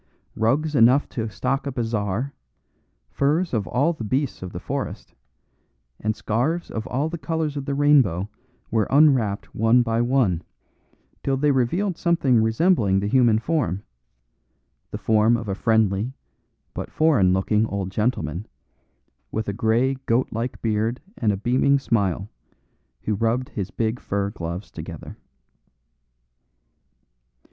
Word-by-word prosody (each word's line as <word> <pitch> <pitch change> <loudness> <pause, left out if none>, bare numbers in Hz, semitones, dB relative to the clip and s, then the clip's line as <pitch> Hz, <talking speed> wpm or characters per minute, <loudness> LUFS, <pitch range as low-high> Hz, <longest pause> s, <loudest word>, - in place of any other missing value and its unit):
Rugs 140 +8 +1
enough 130 +2 +5
to 115 -2 -3
stock 135 +6 -2
a - - -1
bazaar, 115 +1 -2 0.8
furs 155 +5 +1
of 110 -4 0
all 145 +7 +1
the 140 - -7
beasts 130 +5 -1
of 90 -1 -6
the - - -6
forest, - - -5 0.9
and 110 0 -1
scarves 125 +11 -1
of 110 +2 -4
all 135 +5 -1
the 170 +1 -5
colours 160 -2 -2
of 140 -2 -4
the 140 -1 -2
rainbow 135 - +3 0.4
were 110 -2 +1
unwrapped 135 -8 +3
one 115 +3 +4
by 115 0 0
one, 120 -9 +2 0.8
till 135 -1 0
they 145 +2 +3
revealed 165 +9 0
something 140 -9 +3
resembling 110 - +2
the 100 - -2
human 115 0 +4
form; 110 - -1 1.1
the - - -5
form 110 +1 +3
of 115 -2 -6
a 100 - -1
friendly, 110 +2 +1 0.6
but - - -5
foreign 145 - +3
looking 105 +4 +1
old 100 -2 -3
gentleman, 105 - -1 0.8
with 110 0 -3
a 100 - -1
grey 115 +5 +2
goat 120 +3 +2
like 115 +3 -3
beard 110 +2 0 0.2
and 110 - +1
a 100 - -2
beaming 130 +6 +2
smile, 100 -8 0 0.8
who 105 - 0
rubbed 115 +4 0
his 100 -3 -4
big 115 +3 -2
fur 100 0 -2
gloves 85 -1 -6
together. - - -8
115 Hz, 135 wpm, -23 LUFS, 105-135 Hz, 1.1 s, enough